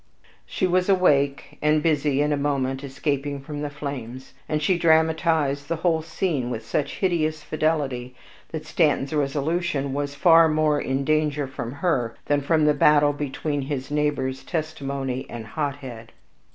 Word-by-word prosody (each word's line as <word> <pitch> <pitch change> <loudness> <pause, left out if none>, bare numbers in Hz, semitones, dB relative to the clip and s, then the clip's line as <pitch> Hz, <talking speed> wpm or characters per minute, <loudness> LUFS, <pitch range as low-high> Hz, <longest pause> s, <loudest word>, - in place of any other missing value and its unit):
She - - -1
was 185 +1 +1
awake, 140 -7 +2
and 150 0 +2
busy 145 -3 +2
in 150 0 +1
a - - +2
moment 135 -2 -1
escaping 140 0 -2
from 145 +1 -7
the 150 - -2
flames; 135 -3 -7 0.2
and 155 - +1
she 180 +5 +2
dramatized 160 -3 +2
the 165 - -1
whole 160 0 +1
scene 160 -5 -2
with 115 -2 -5
such 140 +4 -2
hideous 155 -5 0
fidelity, 140 -6 -1 0.3
that 160 -1 -6
Stanton's 150 -3 +1
resolution 145 0 -1
was 145 0 -3
far 165 +2 +6
more 155 -1 +2
in 135 +1 -1
danger 150 -1 +1
from 130 -3 -6
her 135 -6 -1
than 145 -1 +1
from 155 +2 +2
the 150 - +5
battle 145 -1 +4
between 145 +1 -3
his 135 0 -4
neighbors 145 -3 -1
Testimony 140 -5 -3
and 115 -2 -7
Hothead. 130 -4 -5
145 Hz, 150 wpm, -24 LUFS, 135-155 Hz, 0.3 s, far